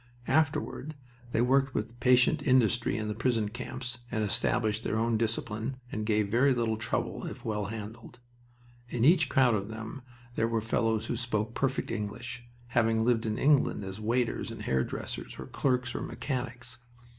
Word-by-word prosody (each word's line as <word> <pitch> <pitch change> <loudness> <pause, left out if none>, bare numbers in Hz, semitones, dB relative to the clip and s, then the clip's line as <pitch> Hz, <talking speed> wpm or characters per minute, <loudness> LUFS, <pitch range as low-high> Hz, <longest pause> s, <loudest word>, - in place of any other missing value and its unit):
Afterward 155 +1 0 0.4
they 115 - +2
worked 135 +1 +3
with 115 +3 -3
patient 125 0 +4
industry 120 -4 +3
in 110 -1 -2
the 105 - -1
prison 115 -1 +1
camps 125 +1 -5
and 110 -1 -1
established 110 +2 0
their 110 - 0
own 115 +1 +2
discipline, 110 +2 -1
and 110 0 -3
gave 105 -2 +2
very 130 +3 +4
little 115 -2 +1
trouble 115 +1 -2
if - - -8
well 105 -2 -1
handled. 110 +2 -7 0.7
In 120 -1 +1
each 155 -2 +5
crowd 130 -4 +4
of 100 -2 -1
them 110 +4 -6 0.3
there 115 -1 +1
were 115 0 +1
fellows 110 0 0
who 120 - -2
spoke 115 -2 -1
perfect 135 +1 -1
English, 120 +4 -5 0.2
having 115 -1 +2
lived 115 -2 +2
in 110 0 -1
England 140 -6 +3
as 95 +2 -6
waiters 115 +2 0
and - - -7
hairdressers, 65 0 -2
or - - -6
clerks 125 -2 0
or - - -3
mechanics. 125 -2 -4
115 Hz, 165 wpm, -30 LUFS, 110-125 Hz, 0.7 s, each